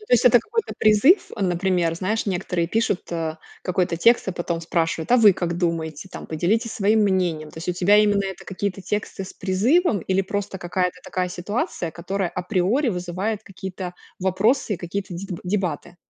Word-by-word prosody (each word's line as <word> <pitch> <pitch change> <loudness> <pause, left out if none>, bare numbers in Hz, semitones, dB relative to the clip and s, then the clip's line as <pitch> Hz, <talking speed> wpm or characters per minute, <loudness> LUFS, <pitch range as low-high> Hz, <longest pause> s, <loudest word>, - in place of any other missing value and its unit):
Ну, 425 - -15
то - - -3
есть 245 - +3
это 240 0 +7
какой-то 455 - -3
призыв, 215 - +5
например, 180 -2 +1
знаешь, 200 +7 -1
некоторые 180 -3 -1
пишут, 220 -1 0
э, 160 -1 -2 0.3
какой-то 180 -2 0
текст 230 +8 +4
и - - -1
потом 170 -1 -3
спрашивают: 165 +3 -1
"А - - +8
вы 215 -4 +7
как 175 -1 -2
думаете? 165 -1 -2
Там - - -8
поделитесь 215 +9 0
своим 215 +2 +2
мнением". 180 -6 +1
То - - -11
есть 165 - -7
у - - +2
тебя 185 +4 +4
именно 205 -1 +3
это 190 -1 -6
какие-то 195 0 -3
тексты 200 0 -3
с - - -10
призывом 215 - +2
или 190 +3 +1
просто 200 0 -4
какая-то 180 +1 -1
такая 185 -1 -2
ситуация, 180 - -3
которая 185 +1 -2
априори 190 - 0
вызывает 190 +3 -2
какие-то 185 -1 -7 0.2
вопросы 205 +5 +1
и - - -5
какие-то 185 +2 -5
деб 180 0 -5
дебаты? 180 -4 -2
190 Hz, 180 wpm, -23 LUFS, 175-210 Hz, 0.3 s, А